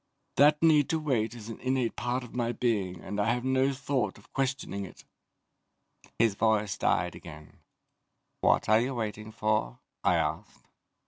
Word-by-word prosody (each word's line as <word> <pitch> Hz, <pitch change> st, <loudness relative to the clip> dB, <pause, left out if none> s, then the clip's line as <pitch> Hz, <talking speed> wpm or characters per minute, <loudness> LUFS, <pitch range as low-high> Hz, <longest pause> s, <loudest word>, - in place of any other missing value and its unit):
That 150 Hz, +2 st, +5 dB
need 150 Hz, -3 st, +5 dB
to 160 Hz, -, +1 dB
wait 120 Hz, -7 st, 0 dB
is 115 Hz, -1 st, -9 dB
an 115 Hz, -, -7 dB
innate 130 Hz, -2 st, 0 dB
part 125 Hz, +1 st, -2 dB
of 125 Hz, -, -12 dB
my 120 Hz, -1 st, -1 dB
being 100 Hz, -9 st, -1 dB
and 105 Hz, -, -5 dB
I 105 Hz, +3 st, +2 dB
have 125 Hz, +1 st, -5 dB
no 130 Hz, +1 st, +2 dB
thought 135 Hz, -6 st, -2 dB
of 105 Hz, -, -21 dB
questioning 135 Hz, -7 st, -2 dB
it." 95 Hz, -, -11 dB, 1.1 s
His 115 Hz, -2 st, +3 dB
voice 105 Hz, -1 st, +1 dB
died 90 Hz, +1 st, +1 dB
again. 75 Hz, -2 st, -12 dB, 0.8 s
"What -, -, +3 dB
are 110 Hz, +1 st, +5 dB
you 130 Hz, +2 st, -2 dB
waiting 110 Hz, -1 st, -4 dB
for?" 105 Hz, -, 0 dB, 0.3 s
I -, -, +4 dB
asked. -, -, -3 dB
115 Hz, 160 wpm, -29 LUFS, 105-130 Hz, 1.1 s, That